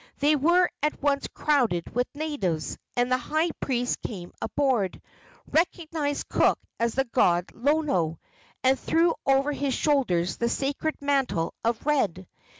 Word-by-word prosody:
They 295 +2 +3
were 345 +5 +4
at 300 +1 0
once 280 -1 +1
crowded 245 - 0
with 245 +1 +1
natives, 195 - -2 0.2
and 245 +1 +1
the 255 - +3
high 315 +6 0
priest 245 -2 -1
came 180 -6 -7
aboard, 255 -10 0 0.5
recognized 315 -3 0
Cook - - +3 0.2
as 235 -1 0
the 270 - +3
god 175 -7 +2
Lono, 240 - +1 0.4
and 260 0 +3
threw 335 +5 +2
over 275 +2 +3
his 280 -2 -1
shoulders 185 - +1
the 235 - 0
sacred 285 +5 -1
mantle 270 -12 0
of 230 +1 -1
red. 200 - 0
270 Hz, 140 wpm, -26 LUFS, 220-295 Hz, 0.5 s, were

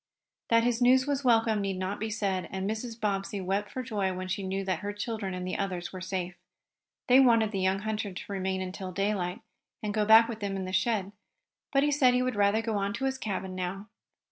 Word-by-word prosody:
That 230 0 +5
his 240 0 +1
news 260 +1 +5
was 285 -1 -1
welcome 225 -3 +3
need 195 -1 -2
not 185 +2 -3
be 220 - -2
said, 195 -4 -2
and 190 0 -3
Mrs. 225 +2 -4
Bobbsey 200 -1 -1
wept 195 +2 -1
for 255 - -4
joy 205 -5 -1
when 185 0 -5
she 185 +2 -2
knew 195 0 -3
that 185 -3 -1
her 205 0 -4
children 205 -2 -4
and 180 0 -4
the 185 - -3
others 185 -3 -3
were 185 - -6
safe. 185 -1 -3 0.7
They 255 +1 +7
wanted 230 -5 +5
the 195 - -2
young 190 +1 +1
hunter 215 -1 -2
to 185 +2 -8
remain 190 -1 -1
until 185 0 -6
daylight, 195 +1 -1 0.4
and 210 -1 -2
go 215 0 +2
back 225 +2 +8
with 230 -2 -5
them 200 -2 -3
in 190 -1 -3
the 185 - -6
sled, 200 -3 +1 0.6
but 275 -1 +3
he 295 - +2
said 260 -4 +4
he 250 - +2
would 255 -2 -1
rather 205 +2 +3
go 225 -2 -1
on 200 0 -1
to 265 +4 -2
his 265 0 -1
cabin 190 -4 -3
now. 185 +3 -4
205 Hz, 230 wpm, -29 LUFS, 190-225 Hz, 0.7 s, back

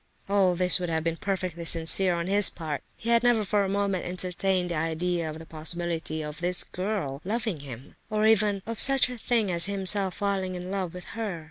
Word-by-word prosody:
All 195 -3 +2
this 180 +1 +4
would 175 -1 -4
have 160 -1 -2
been 165 0 -2
perfectly 185 -4 -4
sincere 170 +2 +6
on 170 0 -3
his 200 +2 +5
part. 155 -4 -6 0.2
He 230 - -4
had 235 0 +4
never 240 -3 +2
for 205 +1 +1
a 195 - -3
moment 200 -2 -1
entertained 180 0 -2
the - - -2
idea 165 +1 -2
of 155 - -7
the 165 - -11
possibility 160 0 -3
of 150 +1 -8
this 180 +1 -1
girl 180 -8 -4
loving 215 -3 -3
him, 135 -2 -11 0.2
or 215 0 0
even 210 -3 +2
of 230 -1 -6
such 270 -1 +5
a 250 - -7
thing 225 -5 0
as 170 +1 +6
himself 195 -1 +2
falling 195 -2 -2
in 180 +1 -7
love 185 -3 -4
with 180 - -9
her. 210 -6 -4
185 Hz, 210 wpm, -26 LUFS, 170-200 Hz, 0.2 s, sincere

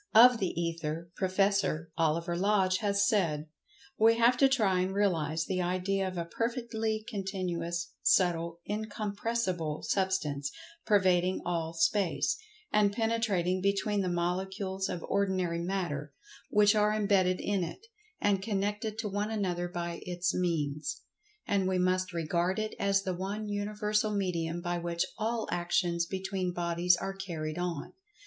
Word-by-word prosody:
Of 240 +1 +8
the 185 -3 -1
Ether, 165 0 -3
Prof. 185 -1 -3 0.6
Oliver 165 +1 +1
Lodge 190 0 +2
has 200 -1 +2
said, 165 -9 +1 0.5
"We 225 +1 +6
have 235 +2 +5
to 270 +1 +5
try 210 -9 +2
and 185 +1 -1
realize 165 -6 +1
the 185 -1 -1
idea 185 +2 0
of 185 -1 -5
a 170 - -2
perfectly 225 +1 -2
continuous, 180 -5 -3
subtle, 170 -2 +2
incompressible 205 -5 -2
sub[Pg 190 -1 +2
103]stance, 150 -7 -1 0.4
pervading 185 -3 +3
all 165 -2 -1
Space, 160 -3 +2 0.4
and 210 -1 +4
penetrating 205 -5 0
between 200 +1 +1
the 185 - -1
molecules 190 +2 -2
of 170 - -4
ordinary 185 -4 0
Matter, 170 -6 -3 0.4
which 205 0 +5
are 210 0 +3
imbedded 195 -4 +2
in 200 -3 0
it, 170 - -7 0.3
and 200 -2 +2
connected 210 +1 -2
to 225 -1 -2
one 205 +1 -2
another 180 -5 -1
by 170 -1 -4
its 180 0 -1
means. 160 - -1 0.4
And 195 -2 +1
we 185 0 +1
must 185 0 +1
regard 170 +2 0
it 215 0 -2
as 195 0 +2
the 185 - -1
one 200 +4 -4
universal 210 +1 0
medium 175 -4 -1
by 175 0 -2
which 170 +1 -1
all 225 +1 -1
actions 175 0 +1
between 190 -1 -2
bodies 175 +1 +2
are 195 +2 -3
carried 170 -4 -4
on. 175 -4 -3
185 Hz, 140 wpm, -30 LUFS, 170-205 Hz, 0.6 s, Of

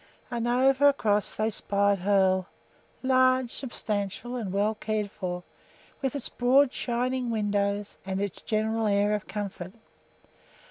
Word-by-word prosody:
And 240 -1 -1
over 265 +3 +4
across 210 -7 0
they 220 +1 0
spied 200 -1 +1
Hoel, 190 -1 +2 0.6
large, 255 -1 +3
substantial, 220 -2 -4
and 220 -6 -3
well 205 +3 +1
cared 215 -2 -2
for, 180 -1 -4 0.6
with 270 0 -1
its 280 - -1
broad, 255 +2 +3
shining 250 +1 -1
windows 205 -2 -1
and 190 0 -3
its 200 -2 -4
general 220 0 0
air 205 +1 +2
of 210 -1 -3
comfort. 195 -3 -5
215 Hz, 130 wpm, -27 LUFS, 200-245 Hz, 0.6 s, over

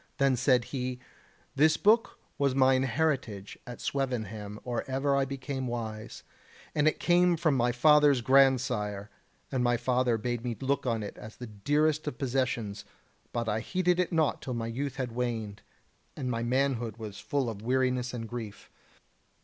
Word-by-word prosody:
Then 135 -1 +3
said 125 -1 +3
he: 125 -1 -2 0.6
"This 155 +3 +4
book 225 +3 +3 0.2
was 140 -2 +2
mine 130 -1 +4
heritage 130 -7 -1
at 120 -1 -8
Swevenham 110 -6 -3
or 120 -2 -2
ever 135 +1 +1
I 135 -1 +2
became 135 -1 -4
wise, 110 -3 -5 0.5
and 150 0 +2
it 155 - +2
came 175 0 +4
from 160 -3 +2
my 120 -1 +2
father's 145 +1 +5
grandsire: 120 -6 +2 0.4
and 130 -2 0
my 120 0 +2
father 125 -1 +1
bade 120 +1 -3
me 120 -2 -3
look 135 0 -1
on 115 -3 0
it 100 - -8
as 110 +1 -10
the 125 - -8
dearest 145 +9 0
of 135 - -3
possessions; 120 -6 -1 0.5
but 115 -1 -2
I 110 0 0
heeded 180 +6 0
it 180 - +1
naught 160 -3 +1
till 125 - -4
my 115 -1 -2
youth 135 +4 -3
had 130 -3 -3
waned, 115 -4 -3 0.6
and 125 -1 -2
my 115 -1 -2
manhood 120 -3 0
was 105 -3 -7
full 125 +5 -1
of 110 -3 -5
weariness 125 +1 0
and 115 -2 -5
grief. 110 -3 -8
125 Hz, 165 wpm, -29 LUFS, 115-140 Hz, 0.6 s, father's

